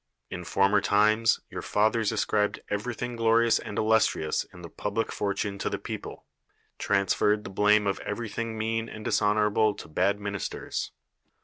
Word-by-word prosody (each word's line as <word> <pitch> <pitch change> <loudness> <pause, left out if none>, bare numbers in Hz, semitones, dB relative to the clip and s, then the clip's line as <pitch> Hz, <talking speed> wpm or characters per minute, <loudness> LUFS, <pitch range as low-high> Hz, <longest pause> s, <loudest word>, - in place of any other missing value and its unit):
In 90 -1 -5
former 100 +3 +3
times 110 +3 +3
your - - -5
fathers 110 +1 +1
as 110 - 0
cribed 105 -1 0
everythinir 120 +3 -3
glorious 115 0 +3
and 105 -2 -7
illustrious 110 -8 +2
in 90 - -15
the - - -6
public 105 +6 -3
fortune 100 0 -2
to - - -1
the - - -2
people; - - -7 0.5
transferred 105 +1 +1
the 95 - -8
blame 105 +2 +3
of 100 -1 -1
everything 115 +1 -4
mean 115 +1 -2
and 110 - -9
dishonorable 105 0 +2
to - - -10
bad 95 +6 +1
ministers. 100 -1 -4
105 Hz, 150 wpm, -27 LUFS, 100-110 Hz, 0.5 s, former